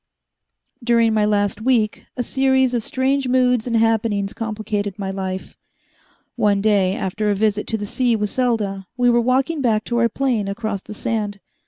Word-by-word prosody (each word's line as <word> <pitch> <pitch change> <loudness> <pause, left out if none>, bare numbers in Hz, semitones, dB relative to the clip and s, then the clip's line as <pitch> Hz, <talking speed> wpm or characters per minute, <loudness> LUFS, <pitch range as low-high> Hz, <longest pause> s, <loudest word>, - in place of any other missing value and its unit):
During 230 -1 +3
my 215 -1 +2
last 205 0 0
week, 225 -3 +1
a 245 - 0
series 265 -1 +2
of 240 - 0
strange 265 +3 0
moods 250 -2 +2
and 230 -1 +1
happenings 220 -3 +1
complicated 215 -3 -3
my 195 -2 -3
life. 190 -1 -5 0.8
One 210 -4 +2
day, 200 -2 +2
after 210 +3 -2
a 205 - +2
visit 210 0 0
to 225 - -1
the 205 - -4
sea 240 +3 +1
with 210 -1 -2
Selda, 210 -7 -1
we 245 -1 +4
were 240 0 +3
walking 265 +5 +1
back 220 -4 +1
to 240 0 -1
our 235 0 +3
plane 235 -4 -1
across 200 0 -3
the 210 - -10
sand. 210 -2 -3
220 Hz, 175 wpm, -21 LUFS, 205-245 Hz, 0.8 s, we